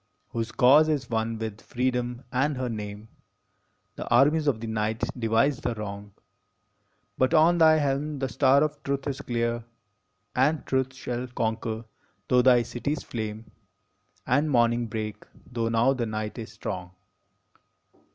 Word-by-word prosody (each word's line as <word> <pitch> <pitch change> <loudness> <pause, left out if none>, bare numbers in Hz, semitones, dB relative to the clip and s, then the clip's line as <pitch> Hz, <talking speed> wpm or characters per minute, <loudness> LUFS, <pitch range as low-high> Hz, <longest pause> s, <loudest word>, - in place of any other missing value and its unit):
Whose 115 -1 -3
cause 145 +5 +6
is 135 -6 -1
one 110 0 -1
with 110 -1 -5
Freedom 125 0 -2
and 135 +2 +1
her 130 -1 -2
name. 105 -1 -6 0.9
The - - -6
armies 150 +6 +4
of 130 -6 +2
the 115 - -6
night 110 0 -2
devise 120 +3 +2
thee 120 - -2
wrong, 100 -1 -7 1.0
But 130 +6 +3
on 170 +2 +5
thy 160 -1 +7
helm 145 +1 -1
the 135 -1 -1
star 135 +2 +4
of 155 - -3
Truth 140 0 -2
is 140 -1 -3
clear, 120 -2 -1 0.7
And 145 +4 +2
Truth 130 0 -1
shall 125 -1 -4
conquer, 110 -1 -3 0.4
tho 125 0 +4
thy 125 -1 +5
cities 140 +6 -3
flame, 110 -1 -6 0.7
And 145 +5 +2
morning 120 -2 +2
break, 110 -1 -5 0.3
tho 115 -2 -1
now 115 +4 +3
the 120 -3 -2
night 110 +2 -4
is 110 -2 -7
strong 90 -4 -6
120 Hz, 145 wpm, -26 LUFS, 110-135 Hz, 1.0 s, thy